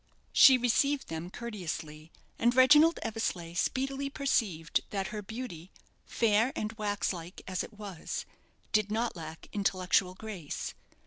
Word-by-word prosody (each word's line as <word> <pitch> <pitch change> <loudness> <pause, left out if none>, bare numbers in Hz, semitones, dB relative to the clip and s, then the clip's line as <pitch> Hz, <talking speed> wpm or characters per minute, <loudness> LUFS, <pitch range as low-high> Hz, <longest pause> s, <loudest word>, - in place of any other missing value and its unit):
She 265 -1 +9
received 265 +4 +1
them 165 +2 -5
courteously, 165 -8 -6 0.3
and 240 +1 +3
Reginald 295 +6 +7
Eversleigh 200 -7 -3
speedily 270 +8 -1
perceived 210 - 0
that 195 -2 -2
her 210 - -5
beauty, 200 -5 -7 0.4
fair 225 +2 +2
and 215 +1 -3
wax 205 -3 -1
like 175 0 -9
as 185 -1 -2
it - - -10
was, 205 -5 -6 0.5
did 215 -2 +2
not 225 +2 -1
lack 160 -1 -8
intellectual 185 -2 +1
grace. 195 -8 -6
210 Hz, 130 wpm, -30 LUFS, 180-240 Hz, 0.5 s, She